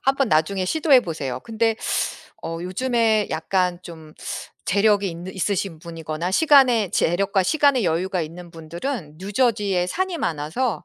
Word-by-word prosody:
한번 270 -2 +2
나중에 185 +5 +1
시도해 295 - +4
보세요. 140 - -4
근데 225 0 0 0.7
어 165 0 -4
요즘에 220 +2 +1
약간 180 +2 0
좀 160 -2 -12 0.5
재력이 205 0 +3
있는 175 +3 -8
있으신 190 -3 -2
분이거나 165 0 -5
시간의 250 - +4
재력과 195 +2 +1
시간의 280 - +3
여유가 180 +3 0
있는 170 +2 -9
분들은 165 - -6
뉴저지에 205 -3 0
산이 365 - -2
많아서 165 - -2
190 Hz, 320 characters per minute, -22 LUFS, 165-230 Hz, 0.7 s, 시도해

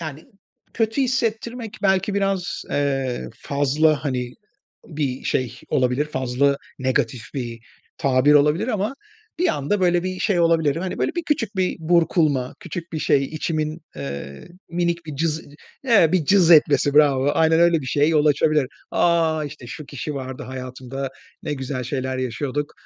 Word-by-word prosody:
yani, 155 -2 -7 0.5
kötü 225 +4 +1
hissettirmek 235 -2 -2
belki 195 0 +2
biraz, 195 -3 -1
eee, 135 -3 -1
fazla, 145 +2 +1
hani, 125 -3 -2 0.5
bir 145 -5 -3
şey 125 -1 -1
olabilir, 130 +2 +1
fazla 135 0 +1 0.2
negatif 130 -3 0
bir 120 -3 -4 0.4
tabir 135 +1 +3
olabilir 150 - +3
ama 215 +2 -1 0.4
bir 360 +1 +2
anda 190 - 0
böyle 175 -1 +3
bir 185 0 -3
şey 180 -4 +2
olabilirim. 165 -1 +2
Hani, 185 - -4
böyle, - - 0
bir 345 - 0
küçük 225 -9 -1
bir 185 -1 0
burkulma, 160 -5 +2
küçük 170 -2 -7
bir 155 - -2
şey, 140 -2 +2
içimin, 155 +1 -3 0.2
eee, 70 0 -7 0.2
minik 170 -1 -1
bir 150 - -6
cız 160 +1 -1 0.4
evet, 200 -10 +5
bir 175 -5 +2
cız 185 0 +4
etmesi 145 -3 +5
bravo, 145 -2 +4
aynen 160 0 +4
öyle 170 -2 +4
bir 130 - -7
şeye 145 +3 +2
yol 155 -2 +3
açabilir. 150 -1 +3 0.2
"A! 165 -2 +2
İşte, 145 -4 -9
şu 145 +4 -8
kişi 145 +1 -5
vardı 130 -1 -6
hayatımda, 130 +1 -6 0.3
ne - - -2
güzel 130 -1 -4
şeyler 130 0 -3
yaşıyorduk 140 +3 -3
150 Hz, 150 wpm, -22 LUFS, 130-175 Hz, 0.5 s, evet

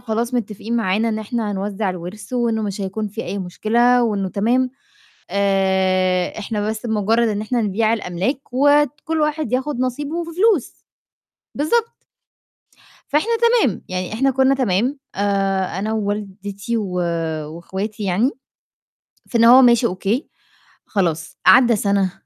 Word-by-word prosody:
خلاص 235 +1 -2
متفقين 225 0 -3
معانا 220 0 +1
إن 220 -1 -1
إحنا 220 0 -3
هنوزع 200 +1 -2
الورث 180 +7 -8
وإنه 235 -3 0
مش 200 -1 -4
هيكون 200 +2 -3
فيه 220 +3 -6
أي 200 - -4
مشكلة، 235 +7 +2
وإنه 200 -4 -1
تمام، 240 +7 +1 0.6
آآ 190 -2 +1
إحنا 210 0 -3
بس 220 +2 -4
بمجرّد 225 +1 +1
إن 210 -1 -2
إحنا 235 +2 -1
نبيع 215 +2 +1
الأملاك، 205 +5 -2
وكلّ 290 +3 +2
واحد 300 -2 -1
ياخد 260 +1 -1
نصيبه 290 +7 -2
في 335 - -8
فلوس، 385 - +1 0.7
بالضبط. 455 +11 -1 1.1
فإحنا 305 +11 +1
تمام، 465 - +2
يعني 185 +1 -4
إحنا 270 +5 +2
كنا 265 +1 +3
تمام، 250 +2 0 0.2
آآ 195 -2 0
أنا 215 +3 -2
ووالدتي 205 0 -3
و 205 -4 -2 0.6
واخواتي 195 +5 -5
يعني، 200 +7 +2 1.0
في 235 - -1
إن 230 - +4
هو 250 +3 +9
ماشي 240 -1 +5
أوكي، 200 - -2 0.6
خلاص، 165 -5 -2
عدَّى 235 +5 +7
سنة، 200 -2 +1
220 Hz, 135 wpm, -20 LUFS, 195-250 Hz, 1.1 s, هو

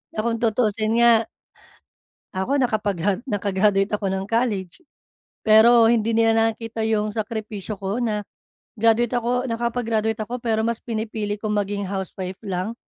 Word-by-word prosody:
Na - - -3
kung 230 -1 0
tutusin 220 -1 +1
nga 230 -1 +5 1.1
ako 225 +10 0
nakapag 215 -5 0 0.3
naka-graduate 200 -3 +1
ako 205 -1 -4
ng 190 +1 -3
college. 225 - -1 0.6
Pero 225 +2 +7
hindi 230 -1 +2
nila 225 0 +4
nakikita 225 0 -1
yung 215 -1 0
sakripisyo 215 -1 -4
ko 195 +4 -3
na 210 -3 -1 0.5
graduate 230 +2 +3
ako 245 +2 0
nakapag-graduate 230 -1 -1
ako, 240 +4 -4
pero 225 -2 0
mas 235 0 0
pinipili 215 -2 -3
kong 215 -1 -2
maging 205 0 -2
housewife 190 -1 -5
lang. 190 +3 -3
220 Hz, 135 wpm, -23 LUFS, 205-230 Hz, 1.1 s, Pero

